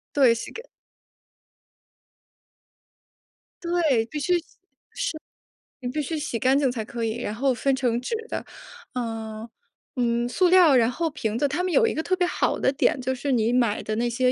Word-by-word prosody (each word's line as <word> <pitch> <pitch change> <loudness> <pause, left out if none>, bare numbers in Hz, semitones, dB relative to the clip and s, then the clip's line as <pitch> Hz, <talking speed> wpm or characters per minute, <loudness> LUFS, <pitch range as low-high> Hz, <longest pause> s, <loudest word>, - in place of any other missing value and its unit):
对， 260 -5 +6
洗 230 - -6
干 460 - -8 3.0
对， 325 -10 +1
必 300 - -6
须 350 +4 +2
洗。 - - -5
是， - - -26 1.3
你 250 - -4
必 300 +4 -2
须 315 +3 -3
洗 295 -6 -3
干 260 +2 +3
净 275 -3 +2
才 230 -3 -3
可 230 +2 -5
以。 225 0 -1
然 210 - -3
后 260 +4 +1
分 270 +2 +1
成 245 -3 0
纸 255 - -2
的， - - -4 0.5
呃， 225 -2 -5 0.5
嗯， 240 -1 +1
塑 360 +8 +2
料， 350 -6 +6
然 235 -2 +4
后 325 +6 -1
瓶 225 -7 -3
子。 285 - +2
它 300 +6 -2
们 370 - -1
有 460 +5 +4
一 450 - +1
个 315 - -1
特 370 +3 0
别 365 -1 +1
好 - - 0
的 - - +2
点， 270 - +1
就 260 +1 -1
是 275 +2 -3
你 235 -1 +2
买 235 -4 +1
的 215 - -2
那 240 +1 +1
些 250 +1 +2
255 Hz, 200 characters per minute, -25 LUFS, 235-300 Hz, 3.0 s, 对